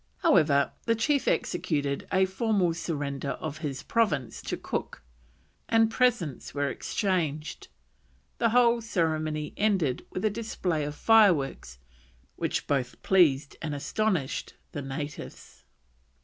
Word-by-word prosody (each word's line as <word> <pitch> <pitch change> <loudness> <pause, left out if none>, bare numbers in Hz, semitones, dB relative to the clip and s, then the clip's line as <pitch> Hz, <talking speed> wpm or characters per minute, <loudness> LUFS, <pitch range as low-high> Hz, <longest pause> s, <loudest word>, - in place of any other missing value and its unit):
However, 150 - +4 0.2
the 230 - +3
chief 275 +5 +1
executed 150 -6 -1
a 190 0 +4
formal 190 -2 +1
surrender 145 -4 -3
of 155 -1 -6
his 145 -2 -4
province 150 - 0
to - - -4
Cook, - - -5 0.7
and 225 -1 +4
presents 225 - 0
were 145 0 0
exchanged, 160 -2 -2 0.7
the 230 - +3
whole 235 0 +4
ceremony 155 -7 -1
ending 190 -11 +1
with 185 - -3
a 215 - +3
display 185 -8 -2
of 145 0 -5
fireworks 170 - +3 0.6
which - - -2
"both 130 -3 -1
pleased 150 -7 +3
and 150 -2 -3
astonished" 175 -1 -1 0.2
the 145 - -5
natives. 145 +2 -7
165 Hz, 120 wpm, -28 LUFS, 145-215 Hz, 0.7 s, However